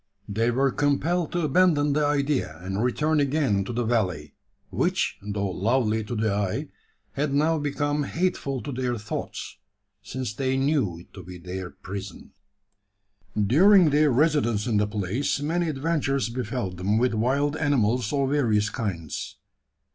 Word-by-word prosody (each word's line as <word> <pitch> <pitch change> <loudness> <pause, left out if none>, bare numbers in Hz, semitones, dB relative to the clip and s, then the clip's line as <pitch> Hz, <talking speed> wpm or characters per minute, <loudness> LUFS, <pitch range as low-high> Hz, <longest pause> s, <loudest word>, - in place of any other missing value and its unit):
They 110 +3 0
were 135 +3 +2
compelled 150 +5 0
to 175 - 0
abandon 150 -2 +3
the 150 +1 +2
idea, 140 - 0
and 95 +4 -2
return 150 +5 +1
again 140 -8 +1
to - - -4
the 120 +1 -1
valley; 90 - -1 0.4
which, - - 0
though 100 -1 -2
lovely 110 +3 +1
to 120 - -4
the 110 -2 0
eye, 100 -2 -2 0.4
had 140 0 -1
now 155 +2 +2
become 145 0 -1
hateful 150 -6 -2
to 145 - -5
their 125 -1 -2
thoughts: 110 0 -6 0.4
since 130 -4 -5
they 130 +3 -1
knew 135 - +1
it - - -21
to 95 - -9
be 90 +1 -10
their 90 +1 -6
prison. 95 0 -8 1.1
During 165 - +6
their 150 +1 +4
residence 130 -6 +2
in 115 -4 +1
the 105 0 +2
place, 105 +8 -1
many 165 +3 0
adventures 140 -3 0
befel 120 -4 -3
them 95 +4 0
with 125 +1 +2
wild 135 +7 +1
animals 125 -7 +1
of 140 -2 0
various 110 -7 +2
kinds. 85 -9 -4
125 Hz, 150 wpm, -25 LUFS, 105-145 Hz, 1.1 s, During